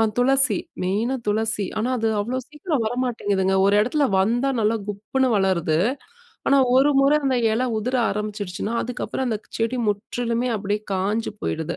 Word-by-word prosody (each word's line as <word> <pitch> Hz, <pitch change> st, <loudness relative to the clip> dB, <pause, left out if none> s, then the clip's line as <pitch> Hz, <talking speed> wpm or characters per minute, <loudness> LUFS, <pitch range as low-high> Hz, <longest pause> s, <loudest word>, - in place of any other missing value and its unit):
அ -, -, +5 dB, 0.2 s
துளசி 260 Hz, -4 st, +3 dB, 0.3 s
மெயினா 215 Hz, +8 st, 0 dB
துளசி. 215 Hz, -1 st, 0 dB
ஆனா, 240 Hz, +4 st, 0 dB
அது 225 Hz, 0 st, +1 dB
அவ்ளோ 245 Hz, +5 st, -2 dB
சீக்கிரம் 300 Hz, -3 st, -2 dB
வரமாட்டேங்குதுங்க. 205 Hz, -6 st, 0 dB
ஒரு 200 Hz, -, +3 dB
இடத்துல 280 Hz, +6 st, +1 dB
வந்தா 240 Hz, +7 st, +2 dB
நல்லா 220 Hz, +1 st, +2 dB
குப்புன்னு 215 Hz, +6 st, -1 dB
வளருது. 170 Hz, -5 st, +1 dB, 0.7 s
ஆனா, 275 Hz, -, +5 dB, 0.2 s
ஒரு 280 Hz, +2 st, +5 dB
முற 275 Hz, +2 st, +4 dB
அந்த 260 Hz, -1 st, +2 dB, 0.2 s
இல 235 Hz, +3 st, 0 dB, 0.2 s
உதிர 250 Hz, +4 st, -1 dB
ஆரம்பிச்சுடுச்சுனா, 210 Hz, 0 st, -4 dB
அதுக்கப்புறம் 250 Hz, +2 st, -3 dB
அந்த 220 Hz, -, -1 dB, 0.2 s
செடி 230 Hz, +3 st, 0 dB
முற்றிலுமே 235 Hz, +4 st, -1 dB
அப்படியே 205 Hz, +1 st, -2 dB
காஞ்சு 205 Hz, +4 st, -1 dB
போயிடுது. 160 Hz, +1 st, -3 dB
225 Hz, 150 wpm, -23 LUFS, 205-255 Hz, 0.7 s, அ